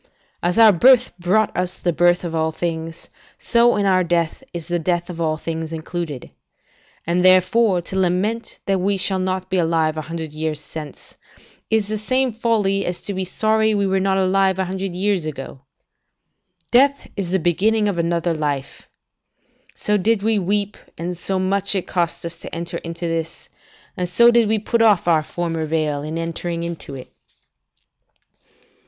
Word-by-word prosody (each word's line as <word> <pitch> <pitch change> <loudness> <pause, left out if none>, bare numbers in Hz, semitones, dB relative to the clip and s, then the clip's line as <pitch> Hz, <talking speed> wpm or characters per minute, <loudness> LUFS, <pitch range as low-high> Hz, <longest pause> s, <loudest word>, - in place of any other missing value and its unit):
As 175 +4 0
our 225 -2 +8
birth 250 +7 +5
brought 190 +5 +1
us 180 0 -2
the 175 - -1
birth 175 +2 +3
of 170 -2 -4
all 160 0 0
things, 165 0 -5 0.3
so 240 0 +3
in 205 - 0
our 185 -1 +3
death 170 +2 -1
is 170 -3 -7
the 175 -1 -1
death 175 +1 -1
of 170 -1 -7
all 155 -1 0
things 160 0 -5
included. 160 -3 -5 0.7
And 175 +2 +1
therefore 185 +1 +4
to 190 +2 -3
lament 190 +6 -1
that 195 -2 0
we 200 +1 +1
shall 190 0 0
not 185 0 -2
be 190 - +1
alive 160 -2 +1
a - - -1
hundred 160 0 -6
years 155 -1 -4
hence, 155 -2 -9 0.5
is 220 -2 +2
the 215 0 -3
same 255 +3 0
folly 210 -4 +1
as 175 0 -1
to 200 - -4
be 190 0 -2
sorry 220 +3 +1
we 200 -1 +1
were 190 0 +1
not 190 0 +1
alive 190 0 +2
a 190 - 0
hundred 190 0 -4
years 195 -1 0
ago. 135 -3 -7 1.1
Death 280 +3 +3
is 195 -4 -3
the 190 - +2
beginning 210 +6 +1
of 190 -4 -1
another 170 0 0
life. 145 -3 -4 0.9
So 210 0 0
did 205 +1 +1
we 220 -1 +2
weep, 200 +2 0 0.2
and 175 +2 -4
so 190 +3 -2
much 195 +2 0
it 190 - -1
cost 170 -2 -2
us 170 0 -6
to - - -9
enter 170 +1 -4
into 170 +1 -5
this, 165 -1 -4 0.5
and 180 -1 -3
so 235 +7 +6
did 235 -2 +4
we 220 +1 +2
put 225 +2 0
off 210 -6 +4
our 165 -2 +4
former 165 0 -3
veil 150 -2 -1
in 155 +2 -5
entering 170 0 -3
into 170 -4 -6
it. 130 - -11
180 Hz, 175 wpm, -21 LUFS, 165-200 Hz, 1.1 s, our